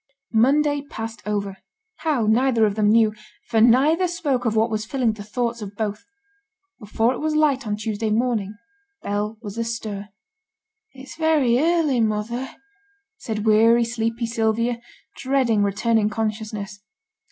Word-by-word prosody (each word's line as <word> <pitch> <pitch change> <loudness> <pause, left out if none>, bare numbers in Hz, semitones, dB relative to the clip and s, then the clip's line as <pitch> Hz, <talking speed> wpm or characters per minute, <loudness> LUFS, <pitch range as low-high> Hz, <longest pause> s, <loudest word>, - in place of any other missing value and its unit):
Monday 290 +5 +3
passed 225 -5 -7
over 200 -2 -2 0.4
how, 295 -8 0
neither 230 +1 +3
of 205 - 0
them 210 0 +2
knew, 220 -1 +4 0.3
for 225 -2 +2
neither 285 +10 +4
spoke 295 -8 -2
of 225 -1 0
what 220 +1 +2
was 215 -1 -1
filling 240 -1 0
the 215 - -10
thoughts 235 +2 -3
of 205 -1 -7
both. 210 0 -3 0.8
Before 225 +2 0
it - - -6
was 310 0 -1
light 285 -5 +2
on 210 - -1
Tuesday 215 0 -3
morning, 215 -2 0 0.5
Bell 210 +2 -2
was 210 +1 -6
astir. 220 -3 -4 0.8
'It's 265 0 -11
very 300 -7 +3
early, 320 -4 +2
mother,' 225 +4 -2 0.7
said 215 - -4
weary, 225 +2 +5
sleepy 230 0 -2
Sylvia, 230 +1 0 0.4
dreading 260 -5 +1
returning 210 +2 +1
consciousness. 215 -2 -4
230 Hz, 140 wpm, -22 LUFS, 215-255 Hz, 0.8 s, weary